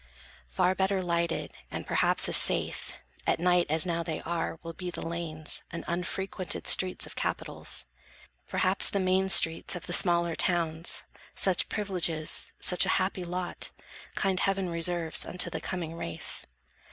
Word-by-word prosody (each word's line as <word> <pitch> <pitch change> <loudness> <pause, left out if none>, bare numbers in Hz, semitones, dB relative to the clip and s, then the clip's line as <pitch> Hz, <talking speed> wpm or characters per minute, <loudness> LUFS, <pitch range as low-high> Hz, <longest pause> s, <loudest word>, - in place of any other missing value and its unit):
Far 180 - +1
better 190 +1 0
lighted, 170 -1 -2 0.2
and - - -6
perhaps - - +3
as - - +5
safe, - - +5 0.3
At - - +1
night, 180 0 +2
as 160 +2 +1
now 170 -1 -2
they 165 -2 -5
are, 165 -1 -4
will 165 0 -7
be 180 +1 -7
the 175 - -7
lanes 165 -2 -4
And 170 - -8
unfrequented 185 +2 -3
streets 185 -1 +4
of - - -11
Capitals; - - -2 0.6
Perhaps, 185 +2 +3
the 200 - -1
main 190 0 +1
streets 165 -3 +5
of 175 - -7
the 175 - -5
smaller 170 -2 +2
towns. 170 -2 -1 0.3
Such 190 -3 +2
privileges, 175 -6 -2
such 180 - +4
a - - -1
happy 185 -1 -2
lot, 180 +1 -2 0.5
Kind 190 -2 0
heaven 195 -2 -1
reserves 170 -1 +1
unto 180 +1 0
the - - -5
coming 170 -4 -5
race. 85 - -3
175 Hz, 150 wpm, -28 LUFS, 165-185 Hz, 0.6 s, as